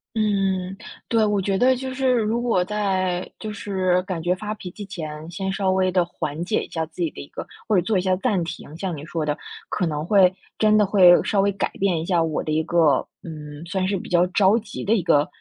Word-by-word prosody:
嗯， 195 -3 0 0.3
对， 225 -2 +3
我 205 -1 +1
觉 195 0 0
得 255 +4 +4
就 260 +1 -5
是 260 0 +1
如 230 -1 +1
果 230 -7 +1
在 185 -3 -1
就 215 - -5
是 190 -3 0
感 185 -4 -4
觉 175 +2 +1
发 210 +3 -4
脾 190 -4 -8
气 205 +3 -9
前， 170 -6 -6 0.2
先 190 +2 -3
稍 190 -1 0
微 185 0 +2
地 180 -2 +2
缓 160 -1 -4
解 210 - 0
一 - - -10
下 160 -1 -2
自 160 +3 -10
己 165 - +1
的 - - -12
一 140 - -8
个 - - -7 0.2
或 215 - +2
者 180 - +4
做 205 +3 0
一 - - +2
下 185 0 +1
暂 195 -5 0
停。 160 -1 -8
像 185 -2 -3
你 145 - -8
说 160 -2 -2
的， 150 -1 0 0.3
可 180 - 0
能 150 0 -3
会 190 -2 +5 0.3
真 215 0 +4
的 210 - +5
会 185 -3 +7
稍 200 -3 +1
微 200 +1 +2
改 200 - -1
变 185 -4 +1
一 160 - -4
下 175 -3 +2
我 160 -2 -1
的 155 - -3
一 155 +1 +2
个， 160 -6 +3 0.2
嗯， 150 -1 -8
算 185 +1 -1
是 195 - 0
比 - - -8
较 175 -1 +3
着 190 +3 +4
急 220 - -7
的 215 - +3
一 215 - +2
个 150 -4 +3
185 Hz, 265 characters per minute, -23 LUFS, 170-205 Hz, 0.3 s, 会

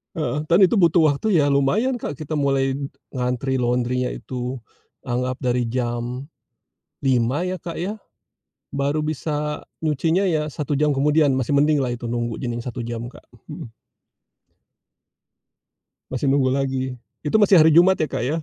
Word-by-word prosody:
Heeh, 150 -2 -2
dan 170 +4 +3
itu 195 +3 +5
butuh 170 -4 +4
waktu 165 +6 +2
ya 145 - +3
lumayan, 145 - +2
Kak, 150 - -6
kita 155 0 -4
mulai 135 -2 +1 0.4
ngantri 125 +1 -1
laundry-nya 125 0 0
itu, 125 0 -5 0.5
anggap 125 +1 -2
dari 125 -1 0
jam 125 +1 -3 0.8
5.00 130 +4 +2
ya, 185 0 -3
Kak, 170 -1 -6
ya, 205 +5 -4 0.7
baru 140 +2 -1
bisa 150 0 -3 0.2
nyucinya 160 +4 +1
ya 155 -2 0
1 145 -1 -3
jam 150 -1 +2
kemudian, 145 +1 +3
masih 130 +2 +1
mendinglah 145 -3 +2
itu 120 0 -5
nunggu 120 -1 -2
cuman 120 -2 -3
1 120 -1 -5
jam, 115 -1 -4
Kak, - - -17 0.2
mhm. - - -7 2.5
Masih 130 +2 -1
nunggu 135 -1 +3
lagi, 130 -2 -2 0.2
itu 150 - -1
masih 205 -2 +5
hari 160 -2 +7
Jumat 175 +4 +6
ya, 155 - -1
Kak, - - -2
ya. 150 - 0
140 Hz, 150 wpm, -22 LUFS, 125-155 Hz, 2.5 s, hari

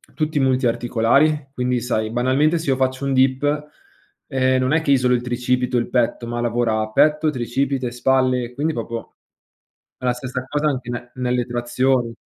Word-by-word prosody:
tutti 155 -1 -1
multiarticolari, 130 +3 +2
quindi, 125 -1 0
sai, 110 -2 -1
banalmente, 130 +7 +2
se 160 -4 -1
io - - +2
faccio 130 +1 -1
un 135 - 0
dip, 145 +3 +1 0.6
ehm, 130 -2 +1
non 130 +3 +1
è 160 - +3
che 155 - -4
isolo 125 -2 +3
il 120 - +1
tricipite 125 0 -1
o - - +4
il 120 - -3
petto, 120 -1 0
ma 120 0 -3
lavora 115 -2 0
petto, 150 +6 +3
tricipite, 130 0 -2
spalle, 130 0 +1
e 120 - -11
quindi 155 +3 -1
proprio 115 0 -6 0.8
è 125 - -11
la 125 - +3
stessa 130 +1 -5
cosa 150 +1 0
anche 130 -4 -3
in 120 0 -6
nelle 125 -1 -1
trazioni. 120 0 0
130 Hz, 175 wpm, -21 LUFS, 120-135 Hz, 0.8 s, o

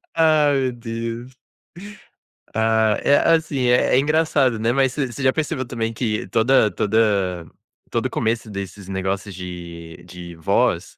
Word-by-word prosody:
Ah, 155 -3 +4
meu 135 -2 +1
Deus. 115 +1 -6 1.2
Ah, 110 -1 +2
é 140 - +5 0.2
assim 145 -6 -1
é 125 +1 +3
é - - +5
engraçado, 145 -4 +2
né, 115 +2 +1
mas 135 0 +1
você 145 0 -1
você 130 - -7
já 130 - +4
percebeu 140 -3 -2
também 115 -2 -3
que 110 -2 -2
toda 115 +1 +3
toda 100 -4 0 0.5
todo - - 0
o - - -11
começo 110 0 -2
desses 100 -1 -7
negócios 95 +1 -3
de 85 -2 -9
de 90 -1 -10
voz, 80 - 0
115 Hz, 150 wpm, -21 LUFS, 95-130 Hz, 1.2 s, é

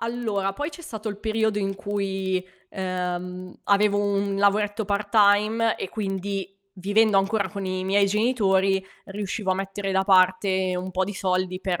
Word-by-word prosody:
Allora, 220 -5 -2
poi 290 +9 -4
c'è 335 +2 -11
stato 220 -8 -6
il 205 -1 -5
periodo 220 0 0
in 195 -1 -1
cui, 195 -2 -2 0.3
ehm, 180 -1 -4
avevo 205 0 +3
un 200 -1 0
lavoretto 205 +2 +2
part-time, 210 +2 +3
e - - -5
quindi, 195 -2 -4 0.2
vivendo 205 +2 +3
ancora 200 0 0
con 200 0 -6
i 185 0 -2
miei 200 +1 +3
genitori, 195 -3 +2 0.2
riuscivo 200 0 -3
a - - +3
mettere 195 +1 -4
da 190 0 +2
parte 185 -1 +3
un 185 +1 -4
po' 185 +1 0
di 205 - -5
soldi 185 -1 -1
per 180 -3 -2
195 Hz, 160 wpm, -24 LUFS, 190-210 Hz, 0.3 s, avevo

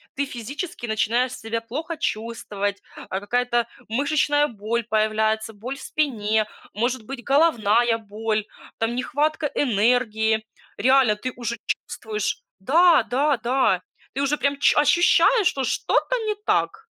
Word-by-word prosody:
Ты 280 +1 0
физически 275 - -6
начинаешь 235 +3 0
себя 225 -1 -4
плохо 310 +8 -5
чувствовать: 210 -5 -3 0.3
а 190 - -2
какая-то 240 +2 0 0.2
мышечная 290 +4 +2
боль 230 +1 -3
появляется, 220 +1 0
боль 250 +7 -6
в - - -12
спине, 220 -8 0 0.3
может 240 +1 -1
быть, 245 0 -8
головная 240 -6 +3
боль, 215 0 -3 0.3
там, 225 +1 -1
нехватка 295 +4 0
энергии. 220 -2 +2 0.3
Реально 255 -2 +4
ты 255 +4 -5
уже 235 -1 -4 0.3
чувствуешь, 215 -2 -3 0.2
да, 330 - +5
да, 280 +2 +1
да, 255 +4 +1 0.3
ты 275 - -2
уже 285 +2 +1
прям 280 0 0
чу - - +4
ощущаешь, 350 +6 +4
что 270 - -1
что-то - - 0
не 425 -1 0
так. 445 +1 0
240 Hz, 130 wpm, -23 LUFS, 220-280 Hz, 0.3 s, да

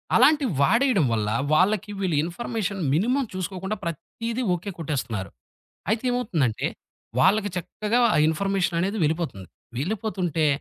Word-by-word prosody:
అలాంటి 300 -2 +5
వాడేయడం 225 - +4
వల్ల 105 -2 0 0.2
వాళ్లకి 205 +6 +3
వీళ్ళు 185 -5 0
ఇన్‌ఫర్మేషన్ 200 +2 -3
మినిమం 245 - +2
చూసుకోకుండా 190 +2 -3
ప్రత్తీదీ 230 - -4
ఓకే 180 +3 -4
కొట్టేస్తున్నారు. 120 - -3 0.6
అయితే 220 +1 +1
ఏమవుతుందంటే 170 - 0 0.5
వాళ్లకి 205 +7 +4
చక్కగా 210 +6 -1 0.2
ఆ - - +3
ఇన్‌ఫర్మేషన్ 180 +2 0
అనేది 200 +4 -1
వెళ్ళిపోతుంది. 155 - -1 0.3
వెళ్ళిపోతుంటే 180 - -1
185 Hz, 115 wpm, -25 LUFS, 160-215 Hz, 0.6 s, అలాంటి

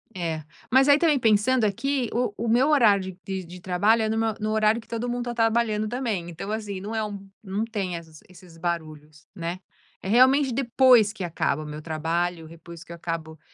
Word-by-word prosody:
É. 165 -4 -3 0.3
Mas 265 +3 +5
aí 285 - +7
também 305 -4 +3
pensando 225 +2 +3
aqui, 255 +4 -1
o 240 -3 0
o 235 - -3
meu 250 +5 +3
horário 200 -10 +3
de 190 -1 -4
de 175 +1 -11
trabalho 205 +5 +2
é 215 - 0
no 220 - -1
meu 225 -1 +1
no 215 0 -2
horário 220 +1 +2
que - - -22
todo 230 +1 -3
mundo 245 0 -3
tá 240 - -3
trabalhando 225 -2 +1
também, 220 -8 -3
então 175 +5 -6
assim, 205 -3 -4
não 210 +3 -6
é 220 - 0
um 200 -2 -7
não 200 +2 -2
tem 205 -6 -3
essas 160 -2 -10
esses 180 -2 -16
barulhos, 155 -3 -5
né. 170 +1 -4 0.4
É - - -5
realmente 260 +4 +5
depois 245 -3 +4
que 200 -4 -6
acaba 155 -3 -1
o - - -9
meu 150 0 -7
trabalho, 165 +1 -2
depois 165 0 -12
que - - -14
eu - - -6
acabo 160 -2 -5
205 Hz, 210 wpm, -25 LUFS, 170-235 Hz, 0.4 s, aí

